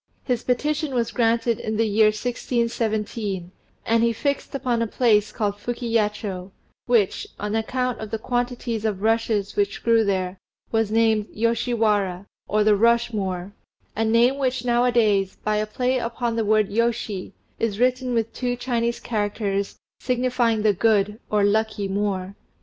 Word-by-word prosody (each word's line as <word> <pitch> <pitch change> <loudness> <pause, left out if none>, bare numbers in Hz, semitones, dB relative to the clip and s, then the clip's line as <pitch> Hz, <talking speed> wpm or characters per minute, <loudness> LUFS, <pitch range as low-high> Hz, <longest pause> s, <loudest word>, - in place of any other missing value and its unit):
His 245 -3 -1
petition 295 +3 0
was 235 -1 0
granted 230 -1 +1
in 215 0 -3
the 225 - +3
year 215 0 +4
1617, 220 -4 -2 0.3
and 230 0 +3
he 235 - +3
fixed 280 +4 -2
upon 250 -4 0
a 230 - 0
place 215 -3 +2
called 205 -3 -2
Fukiyacho, 210 -5 -2 0.4
which, 230 -6 +2
on 210 +1 -2
account 250 +2 -1
of 220 - -6
the 225 - -2
quantities 245 -1 -2
of 210 -3 -2
rushes 220 -2 +1
which 205 -1 -1
grew 230 -1 +4
there, 190 -2 -1 0.3
was 225 -2 +1
named 220 -1 +2
Yoshi 230 +2 0
Wara, 200 -4 +1 0.2
or 210 +1 +2
the 210 0 +5
rush 235 +2 +3
moor, 190 -2 -3 0.4
a 225 - 0
name 235 +5 +3
which 255 -2 -1
now 240 0 +3
a 250 - +3
days, 205 -5 +2
by 215 0 +1
a 215 0 -1
play 255 +4 0
upon 235 0 -2
the 225 -1 0
word 215 -1 +3
yoshi, 220 -3 -1 0.3
is 215 -3 -1
written 255 0 +1
with 225 -1 -1
two 245 -1 -2
Chinese 235 -1 -1
characters, 205 -2 -2 0.2
signifying 245 -3 +1
the 215 -1 +4
"good," 210 +1 +2
or 210 -1 +2
"lucky 210 0 +1
moor." 195 -1 -2
225 Hz, 160 wpm, -23 LUFS, 210-240 Hz, 0.4 s, the